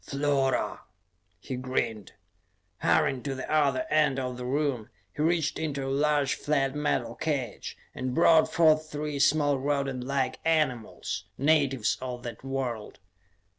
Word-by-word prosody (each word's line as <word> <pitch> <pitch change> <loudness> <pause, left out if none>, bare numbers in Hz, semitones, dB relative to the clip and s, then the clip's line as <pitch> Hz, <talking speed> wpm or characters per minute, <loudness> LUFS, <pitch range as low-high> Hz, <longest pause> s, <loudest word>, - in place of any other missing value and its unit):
"Flora," 140 -1 0 0.6
he 130 - -5
grinned. 125 -5 -3 0.7
Hurrying 125 +11 +2
to 135 0 -3
the 130 - -6
other 140 -4 +2
end 150 -3 +3
of 125 -1 -3
the 125 0 -6
room, 135 -4 -1 0.3
he - - -3
reached 165 -1 +1
into 145 -4 -2
a - - -2
large 145 -1 +2
flat 135 -2 0
metal 150 -4 -1
cage 140 -8 -3 0.2
and 130 0 -3
brought 165 -1 +5
forth 155 -2 +4
three 150 -1 -3
small 145 -1 +3
rodent 140 -2 -1
like 130 -1 -1
animals, 150 -9 -1
natives 140 -5 +2
of 125 -1 -5
that 120 -2 -7
world. 130 -5 -4
140 Hz, 135 wpm, -28 LUFS, 130-150 Hz, 0.7 s, brought